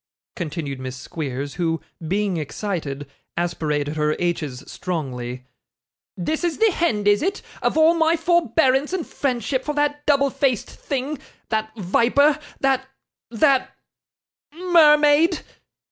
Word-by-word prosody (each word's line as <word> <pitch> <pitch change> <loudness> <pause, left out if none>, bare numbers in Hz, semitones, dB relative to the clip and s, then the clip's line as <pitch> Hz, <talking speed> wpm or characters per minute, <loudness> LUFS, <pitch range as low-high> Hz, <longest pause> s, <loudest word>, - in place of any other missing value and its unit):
continued 150 -5 -4
Miss 130 0 -5
Squeers, 140 0 -5
who, 165 -1 +1 0.3
being 195 0 0
excited, 155 -3 -4 0.3
aspirated 155 -3 -1
her 150 0 +1
h's 155 -7 -2
strongly; 125 -8 -5 0.7
'this 305 - -2
is 345 -3 0
the 445 -1 +4
hend, 220 - 0
is 205 0 +4
it, 390 +4 -1 0.2
of - - 0
all 320 +1 +6
my 325 0 +3
forbearance 320 -3 +2
and 370 -4 -1
friendship 255 -1 -1
for 295 - -3
that 295 0 0
double 280 -2 +3
faced 255 -6 0
thing 275 +1 -4 0.3
that 220 -1 -1
viper, 250 +10 +3 0.2
that 265 -1 +1 0.4
that 265 +3 +2 0.8
mermaid? 310 -1 +5
235 Hz, 120 wpm, -22 LUFS, -, 0.8 s, all